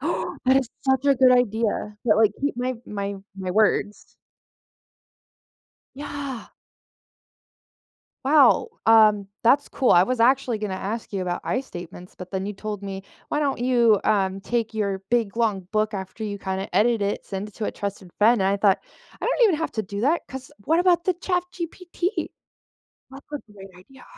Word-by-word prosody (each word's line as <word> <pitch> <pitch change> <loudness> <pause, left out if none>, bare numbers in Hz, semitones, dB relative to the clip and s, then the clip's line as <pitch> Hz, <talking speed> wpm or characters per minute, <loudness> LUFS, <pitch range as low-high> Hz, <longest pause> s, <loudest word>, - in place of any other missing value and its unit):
that 260 +1 0
is 265 -3 +1 0.2
such 265 0 +2
a 280 - +5
good 255 0 +5
idea, 220 -3 0
that, 220 -3 +4
like, 215 -2 +4
keep 285 -2 -1
my 250 +1 -1
my 200 -1 -4 0.2
my 190 -1 -4
words. 210 +1 0 1.8
Yeah. 280 -3 -6 1.8
Wow, 295 - +5 0.2
um, 215 -3 +5 0.2
that's 275 +5 +4
cool, 260 - 0
I 175 - +7
was 250 +4 -2
actually 250 -1 +3
gonna 205 -3 -3
ask 215 +4 -5
you 195 -2 -2
about 175 -1 -3
"I" 255 - 0
statements, 180 -6 -10
but 180 0 -9
then 190 0 -3
you 205 - -4
told 205 0 -6
me, 195 -1 -6 0.3
"Why 295 - 0
don't 285 -2 0
you, 240 -4 +4
um, 195 -2 +1
take 230 0 -2
your 200 -3 -1
big, 230 -4 +1
long 215 -5 +1
book 215 0 0
after 190 +3 -6
you, 205 -1 -4
kinda 190 0 -4
edit 230 0 +3
it, 200 0 -2
send 195 +1 -5
it 210 - -16
to 220 - -3
a - - -2
trusted 200 -3 -6
friend," 225 +2 +5
and 190 - +2
I 200 - +1
thought, 200 -1 +4 0.4
"I - - -4
don't - - 0
I - - +8
even 385 -7 +3
have 325 +1 -3
to 220 - -2
do 200 0 -6
that 300 +8 +2
'cause 265 -1 -9
what 325 +2 +3
about 355 -2 +3
the 370 - +1
ChatGPT?" 360 +1 -3 0.8
That's 270 +1 -12
a 295 - -2
great 195 -1 -12
idea. 265 +9 -17
220 Hz, 180 wpm, -24 LUFS, 200-265 Hz, 1.8 s, I